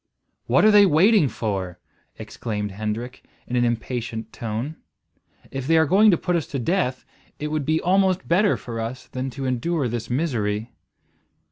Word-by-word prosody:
"What - - +4
are 215 - +7
they 205 -1 +7
waiting 180 - +4
for?" 95 -7 -3 0.4
exclaimed 105 -3 -5
Hendrik 110 +5 -5 0.2
in 125 - -4
an 120 - +3
impatient 120 -1 -3
tone. 115 +7 -4 0.7
"If 135 -1 -5
they 165 +1 +4
are 160 - +5
going 205 +7 +5
to 175 - +4
put 180 +1 -1
us 165 - -1
to 140 - -4
death, 130 -1 -1 0.3
it 150 +1 -4
would 150 -2 -2
be 160 +1 +2
almost 190 0 +2
better 190 +5 +3
for 115 -2 -6
us 125 +3 -5
than 130 0 -4
to 135 +1 -6
endure 130 +4 0
this 120 -1 -4
misery." 120 -6 -1
130 Hz, 165 wpm, -23 LUFS, 115-170 Hz, 0.7 s, are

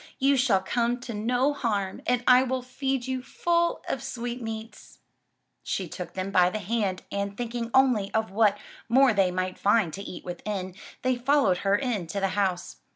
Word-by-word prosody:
You 275 +1 +3
shall 240 -7 +3
come 240 +4 0
to 245 -2 -6
no 245 +6 +1
harm 205 -8 -2
and 245 -1 +1
I 250 0 +7
will 260 -1 -1
feed 265 0 -2
you 260 -1 -2
full 340 +6 0
of - - -2
sweetmeats." 230 -2 -6 0.6
She 190 - -3
took 175 +1 -7
them 190 +1 -3
by 180 -2 +5
the 215 - -3
hand 205 -2 -2
and, 200 0 -3
thinking 235 -1 -3
only 250 -7 +3
of 220 -3 -1
what 210 0 +3 0.3
more 260 +1 +5
they 195 -3 +3
might 185 0 -3
find 200 -5 +3
to 195 - -6
eat 200 - -8
within, 185 +1 -4 0.3
they 255 -1 +1
followed 255 -7 +3
her 200 0 +2
into 205 -7 -2
the 195 0 +1
house. 185 - -1
225 Hz, 175 wpm, -27 LUFS, 195-250 Hz, 0.6 s, I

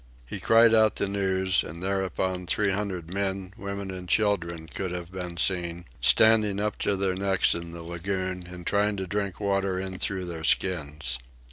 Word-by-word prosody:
He 95 - -6
cried 115 +4 +6
out 110 -2 +5
the 100 - +1
news, 95 -2 +1
and 85 +3 -8
thereupon 95 -1 -1
three 100 +2 +2
hundred 95 -4 -3
men, 95 -1 -2
women, 100 -2 -5
and 90 -1 -7
children 85 -6 +1
could 90 +5 -4
have 90 0 -6
been 90 -2 -6
seen, 85 -1 0 0.2
standing 110 -3 +5
up 105 0 -2
to 100 - +1
their 95 -1 0
necks 95 0 +2
in 85 0 -5
the 85 0 -8
lagoon 90 +1 -3
and 90 -1 -9
trying 105 0 +1
to 95 - -3
drink 100 -1 -3
water 100 -2 0
in 95 -1 -5
through 95 -2 0
their 85 -2 -6
skins. 75 -8 0
95 Hz, 175 wpm, -27 LUFS, 90-100 Hz, 0.2 s, cried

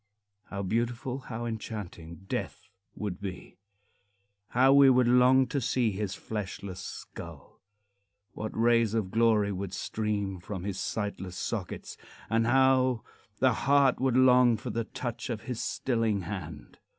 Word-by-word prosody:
How 100 -1 -5
beautiful, 120 +6 -1
how 120 -2 -6
enchanting, 100 -6 -6
Death - - -4 0.3
would 100 -4 -5
be! 95 -2 -7 0.9
How 130 +2 +4
we 140 -1 +8
would 125 -1 +4
long 125 +2 +5
to 140 - -1
see 120 -1 +1
his 100 0 -3
fleshless 100 -3 -6
skull! - - -9 0.7
What 110 - -5
rays 115 -1 +3
of 100 -5 -1
glory 110 -2 +3
would 95 -1 -4
stream 100 -3 -2
from 95 0 -6
his 100 -1 -3
sightless 100 -4 -4
sockets, - - -4 0.3
and 115 0 +2
how 130 -1 +3 0.3
the 130 0 +3
heart 140 +2 +3
would 130 -1 +2
long 125 -2 +6
for - - -5
the 115 -1 -2
touch 120 +1 -5
of 115 -3 -3
his 125 -3 -4
stilling 115 -5 0
hand! 85 -5 -7
115 Hz, 140 wpm, -29 LUFS, 100-125 Hz, 0.9 s, we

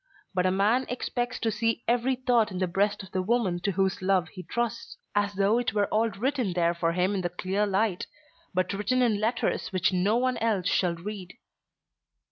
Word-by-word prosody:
But 185 -1 +2
a - - +2
man 215 +7 +2
expects 245 0 -2
to 225 - +1
see 225 +2 -1
every 245 +2 +2
thought 245 -3 +2
in 185 - -6
the 185 - +1
breast 200 +3 0
of 190 - -13
the 185 - 0
woman 195 -3 +1
to 200 +2 -1
whose 190 +1 0
love 185 -3 +2
be 185 - -6
trusts, 235 +3 -3 0.2
as 205 0 0
though 200 +4 +3
it 240 -2 -1
were 205 -1 +3
all 225 +2 +3
written 235 0 -1
there 170 -1 +2
for 170 -1 0
him 180 +3 +1
in 195 - -1
the 175 - -1
clear 190 +4 -1
light, 195 -1 0 0.4
but 185 +1 0
written 250 +6 +1
in 220 -4 +2
letters 230 +2 0
which 185 -1 +1
no 195 +5 +2
one 255 0 +1
else 215 -5 0
shall 180 -1 +1
read." 185 +2 -8
205 Hz, 205 wpm, -27 LUFS, 185-230 Hz, 0.4 s, though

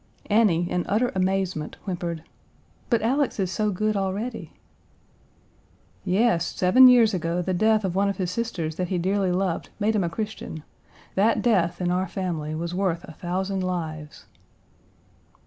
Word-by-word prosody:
Annie, 195 -6 +3
in 180 - 0
utter 230 +5 +1
amazement, 185 -4 -1
whimpered, 170 -4 -4 0.7
"But 230 -3 +2
Alex 265 +1 +1
is 185 -2 0
so 210 +2 0
good 215 +2 0
already." 200 +5 -3 1.5
"Yes, 195 -1 +2
seven 245 +8 +6
years 240 -4 +6
ago 175 0 -1
the 185 - -1
death 215 +2 +2
of 185 - -1
one 200 +2 +2
of 200 - -3
his 185 -2 -2
sisters 175 -8 -3
that 180 - -1
he 185 - -1
dearly 190 +1 0
loved 180 -1 -1
made 215 +1 +1
him 200 - +2
a 170 - -1
Christian. 205 -5 -6 0.5
That 210 +4 +2
death 185 -8 +2
in 175 -1 0
our 185 +1 0
family 170 -5 -3
was 170 +2 -4
worth 180 -2 -1
a - - -10
thousand 190 +3 -3
lives." 160 -5 -5
185 Hz, 155 wpm, -25 LUFS, 175-210 Hz, 1.5 s, seven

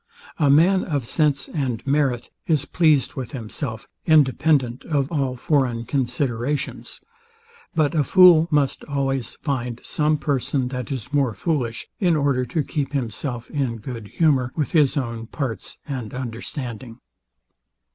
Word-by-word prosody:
A 145 -3 +4
man 175 +7 +5
of 145 -7 -2
sense 145 +2 +1
and 130 -7 -3
merit 135 -4 0 0.2
is 150 -4 +2
pleased 155 -6 +2
with 130 +1 -6
himself, 110 -1 -5 0.2
independent 140 -4 +3
of 145 -2 0
all 135 -5 0
foreign 125 -4 0
considerations: 135 0 -2 0.7
But 155 -1 +2
a 155 -3 +2
fool 175 0 +7
must 145 -4 +1
always 135 -3 -2
find 125 -4 -2
some 150 0 +1
person, 135 -2 -1
that 125 -1 -5
is 130 +1 -5
more 135 -7 +2
foolish, 130 -9 -2
in 175 -5 +3
order 140 -4 +1
to 150 +6 -1
keep 145 -3 -3
himself 120 -1 -3
in 130 -6 -1
good 115 -1 -7
humour 135 -3 +2
with 150 -3 -1
his 150 -4 +3
own 115 -4 -3
parts 130 -4 -5
and 125 -5 -5
understanding. 120 -1 -5
135 Hz, 135 wpm, -23 LUFS, 125-150 Hz, 0.7 s, fool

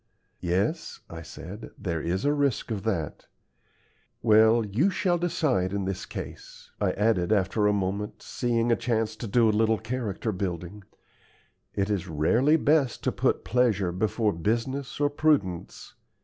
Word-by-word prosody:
"Yes," 100 - -1
I 80 -1 -7
said; 80 +6 -9
"there 85 -4 -3
is 90 - -1
a 145 - +3
risk 140 -5 0
of 105 -3 -2
that. 85 -9 -2 1.0
Well, 110 +1 +5
YOU 115 - +2
shall 180 -2 +1
decide 155 - 0
in 100 -1 -1
this 95 -1 -4
case," - - -9
I - - +2
added, 105 -3 +1
after 105 +1 +2
a - - +4
moment, 100 +1 -2
seeing 120 -1 0
a - - +5
chance 110 -2 -1
to 115 - -5
do 115 +2 +4
a - - +4
little 110 +1 +3
character 110 -1 -3
building. 90 +1 -4 0.9
"It 100 +1 0
is 95 -3 -1
rarely 115 - +3
best 145 -4 +2
to - - +1
put - - 0
pleasure 105 -5 +2
before 105 +3 0
business 120 - -2
or 145 - +3
prudence. 145 - 0
110 Hz, 150 wpm, -27 LUFS, 95-125 Hz, 1.0 s, Well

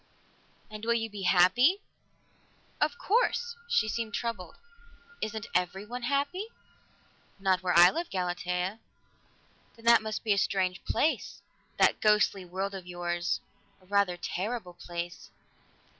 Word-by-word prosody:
"And 215 0 -8
will 235 +1 +2
you 225 -1 -2
be 205 -1 -7
happy?" 245 - +4 1.0
"Of 295 -1 +1
course." 470 +2 +1
She 475 - +2
seemed 220 -1 -3
troubled. 205 -8 -4 0.7
"Isn't 215 -1 -3
everyone 195 +7 -2
happy?" 285 - -1 0.9
"Not 190 -2 +2
where 180 -2 +1
I 175 +1 +9
live, 335 +2 -3
Galatea." 180 +2 -2 1.0
"Then 230 -1 -17
that 235 -1 +7
must 220 0 -4
be 215 - +3
a 200 - +1
strange 185 -1 0
place 315 - 0 0.3
that - - +3
ghostly 210 -2 +3
world 190 +3 -4
of 190 -2 -8
yours. 175 -1 -2 0.4
A 185 - -23
rather 200 -2 +1
terrible 185 +2 -4
place." 175 0 -7
200 Hz, 130 wpm, -29 LUFS, 180-235 Hz, 1.0 s, I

